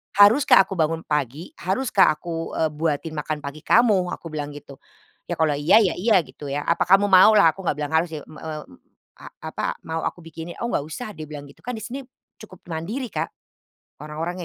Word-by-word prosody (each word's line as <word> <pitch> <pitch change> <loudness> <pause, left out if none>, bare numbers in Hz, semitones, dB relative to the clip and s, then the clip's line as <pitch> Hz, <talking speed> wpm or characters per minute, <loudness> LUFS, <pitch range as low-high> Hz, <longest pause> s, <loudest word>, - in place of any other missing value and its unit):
"Haruskah 205 +2 +7
aku 190 -2 -7
bangun 165 +1 0
pagi? 150 - -3
Haruskah 195 +2 +2
aku, 165 +1 -5
eee, 160 -1 +1
buatin 155 +1 -2
makan 150 0 -4
pagi 140 +2 -6
kamu?" 205 0 +3
aku 165 - -11
bilang 145 -1 -5
gitu. 140 -2 -12 0.5
Ya - - -2
kalau 160 -2 +2
iya, 145 +6 +3
ya, 185 - +1
iya, 220 +4 +3
gitu 150 - -11
ya. 140 +1 -2
"Apa 170 - +1
kamu 195 +2 +5
mau?" 190 +4 +8
lah, 200 -6 +6
aku 190 +1 -9
nggak - - +1
bilang 150 0 -4
harus 160 +2 +2
sih, 150 - -7
m 155 - -13
eee, 155 -1 -6 0.6
a - - -11 0.2
apa, - - -2
"Mau 160 0 -3
aku 175 - -7
bikinin?" 165 +1 -8
"Oh 235 - -2
nggak 145 - -1
usah," 215 +8 -6
dia 155 -6 -9
bilang 145 -1 -8
gitu, - - -23
kan 250 0 -5
di 220 - -7
sini 250 +5 -5 0.4
cukup 190 -4 -14
mandiri, 210 +10 -4
Kak, - - -2 0.8
orang-orangnya 165 +4 -5
165 Hz, 210 wpm, -23 LUFS, 150-195 Hz, 0.8 s, mau